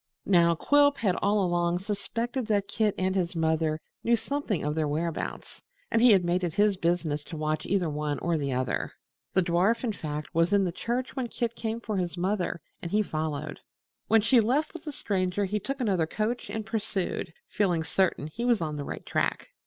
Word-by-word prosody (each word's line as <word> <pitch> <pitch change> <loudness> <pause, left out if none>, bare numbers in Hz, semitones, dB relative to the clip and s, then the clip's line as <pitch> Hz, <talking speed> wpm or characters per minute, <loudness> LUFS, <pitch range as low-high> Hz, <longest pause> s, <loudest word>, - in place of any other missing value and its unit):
Now 170 -3 +5
Quilp 285 - +4
had 195 -5 +1
all 205 -1 +2
along 175 0 +1
suspected 230 +5 -3
that 205 -2 +1
Kit 210 0 +1
and 185 0 +1
his 180 -2 -1
mother 160 -1 +1 0.2
knew 235 - +4
something 265 - -2
of 150 +1 0
their 155 -1 0
whereabouts, 160 +2 -3 0.3
and 225 - +3
he 245 - +7
had 190 -5 +5
made 175 +1 +1
it 170 -3 -1
his 205 0 +4
business 165 -4 0
to 165 - -7
watch 155 0 -1
either 190 -3 +1
one 150 -1 -2
or 170 0 0
the 140 -3 -1
other. 130 0 -1 0.4
The 190 - +4
dwarf, 185 +8 +2
in 230 -3 0
fact, 150 -5 -5
was 165 +4 +2
in 200 -1 +5
the 180 - 0
church 245 +9 -3
when 260 -3 -1
Kit 235 0 -2
came 225 0 -3
for 215 -3 -3
his 175 -1 -2
mother, 180 -2 -1 0.2
and 170 - -4
he 210 +4 +2
followed. 155 -5 -3 0.5
When 225 -1 +5
she 230 +3 +5
left 265 +8 +1
with 335 -2 -9
the 300 - -3
Stranger 195 -5 -1
he 210 +2 -1
took 275 +7 -4
another 190 -9 +1
coach 220 +7 -2
and 220 -1 -4
pursued, 200 -5 -2 0.2
feeling 180 -6 +1
certain 180 -3 +1
he 155 +10 -5
was 240 -3 +3
on 155 -2 -3
the 145 - -3
right - - -6
track. - - -1
190 Hz, 205 wpm, -28 LUFS, 165-220 Hz, 0.5 s, he